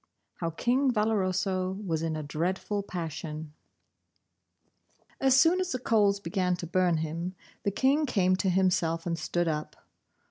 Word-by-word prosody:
X. - - -42 0.3
HOW 165 - -1
KING 255 - +1
VALOROSO 190 -4 0
WAS 160 -3 -1
IN 165 -1 -1
A 155 - -4
DREADFUL 185 +7 -2
PASSION 160 -4 -6 1.7
As 265 -1 +5
soon 340 +5 +5
as 370 -1 -1
the - - 0
coals 210 -5 +2
began 185 -3 0
to 175 - -6
burn 175 0 +2
him, 165 +4 -3 0.3
the - - 0
King 275 +8 +2
came 185 -6 +2
to 190 - 0
himself 175 -3 +1
and 170 -1 0
stood 175 +2 -1
up. 155 -1 -3
185 Hz, 150 wpm, -28 LUFS, 165-210 Hz, 1.7 s, As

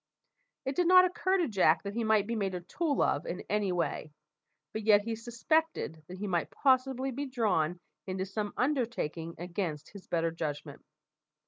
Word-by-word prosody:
It 270 +1 -2
did 355 -1 +2
not 365 0 +8
occur 375 +1 +1
to 350 -4 +1
Jack 180 -6 +3
that 200 0 -4
he 230 +1 -1
might 215 -2 +3
be 230 +2 -2
made 195 -4 -1
a 180 - -4
tool 300 - 0
of - - 0
in - - -4
any 205 -2 +1
way, 170 -3 -2 0.6
but 220 - -3
yet 210 -1 +5
he 230 +1 -2
suspected 240 - -1
that 185 - -8
he 205 - -4
might 175 -4 0
possibly 265 0 +2
be 280 +3 -4
drawn 185 -10 0 0.3
into 190 0 -2
some 205 +1 -3
undertaking 235 - -1
against 170 -3 -4
his 200 -2 -12
better 165 -1 0
judgment. 150 -3 -5
210 Hz, 180 wpm, -31 LUFS, 175-260 Hz, 0.6 s, not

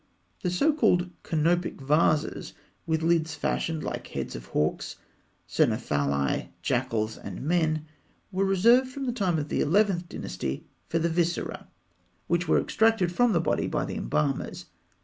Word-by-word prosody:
The 180 - 0
so 280 - +2
called 180 - +2
"canopic 170 +3 0
vases," 150 +2 +1 0.3
with 160 0 0
lids 160 -1 +2
fashioned 160 +1 -1
like - - -4
heads - - -5
of 60 -1 -8
hawks, 75 +1 -1 0.5
cynocephali, 70 -1 +1 0.2
jackals, 110 -1 -1
and 100 +3 -7
men, 155 -1 +1 0.5
were 190 +1 0
reserved 230 +7 +4
from 270 +1 -5
the 250 - 0
time 190 -8 0
of 150 -1 -3
the - - 0
Eleventh 180 +1 +2
Dynasty 70 -8 -4 0.2
for 165 - 0
the 165 +1 +1
viscera, 170 0 -1 0.6
which 175 0 0
were - - +4
extracted 220 -5 +2
from 245 +6 +3
the 170 - +3
body - - 0
by - - -1
the - - -5
embalmers. 75 +6 -1
170 Hz, 150 wpm, -27 LUFS, 150-190 Hz, 0.6 s, reserved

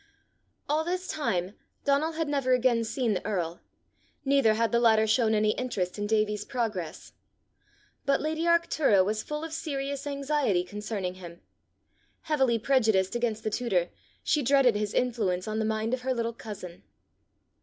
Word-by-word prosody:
All 305 +2 +1
this 365 +2 -2
time, 190 - -1 0.3
Donal 285 +3 +2
had 320 -1 -2
never 275 -3 +1
again 245 -2 +3
seen 230 0 0
the 185 - -3
earl, 175 -5 -2 0.6
neither 270 -5 +4
had 230 -1 +1
the 235 - +3
latter 220 -2 +4
shown 220 0 +2
any 215 0 +3
interest 205 -7 -3
in 205 - -1
Davie's 215 -1 +1
progress. 215 - -4 0.9
But 275 - +3
lady 315 +2 -2
Arctura 315 - +3
was 215 +2 -1
full 300 +1 -5
of 325 -1 -6
serious 280 -3 -3
anxiety 280 -9 0
concerning 205 -1 -4
him. 170 -1 -10 0.8
Heavily 270 -7 +2
prejudiced 220 -6 +2
against 230 -2 -1
the 215 - -1
tutor, 195 -7 0 0.3
she 300 - +2
dreaded 270 -3 +4
his 210 0 -2
influence 215 -7 0
on 215 0 -2
the 220 - 0
mind 220 +2 -1
of 255 - -1
her 260 0 -1
little 230 0 -2
cousin. 200 -6 -9
230 Hz, 155 wpm, -28 LUFS, 210-275 Hz, 0.9 s, neither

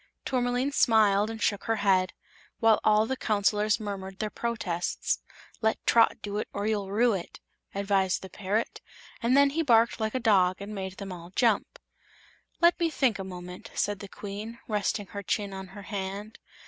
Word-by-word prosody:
Tourmaline 250 +1 0
smiled 215 -5 +4
and 225 0 -6
shook 205 -1 0
her 225 - +1
head, 190 -3 +2 0.5
while 225 -2 +5
all 215 0 +4
the 265 - -2
Counselors 210 -2 +1
murmured 195 -2 -6
their 215 -1 -3
protests. 210 -7 -2 0.4
"Let 220 -1 0
Trot 230 -1 +4
do 205 0 -3
it - - -3
Or 200 0 -2
you'll 210 -3 -1
rue 230 +4 +3
it!" 185 -3 -5 0.4
advised 195 -2 +1
the 190 - -8
parrot, 210 +3 -2 0.4
and 250 +3 +3
then 280 0 +5
he 325 +3 0
barked 235 -6 +4
like 220 +2 -1
a - - +1
dog 190 -6 +3
and 200 +1 -7
made 190 -2 -5
them 195 -1 -6
all 170 -1 -9
jump. 225 -5 +2 0.8
"Let 345 +1 +5
me 335 -1 +2
think 265 -9 +1
a - - -3
moment," 180 -1 -8
said 205 -1 0
the 200 - -8
Queen, 210 +4 -7
resting 210 -1 -1
her 200 - -4
chin 200 +1 -2
on 190 0 -7
her 200 +2 -11
hand. 200 +2 -5
210 Hz, 180 wpm, -28 LUFS, 195-225 Hz, 0.8 s, while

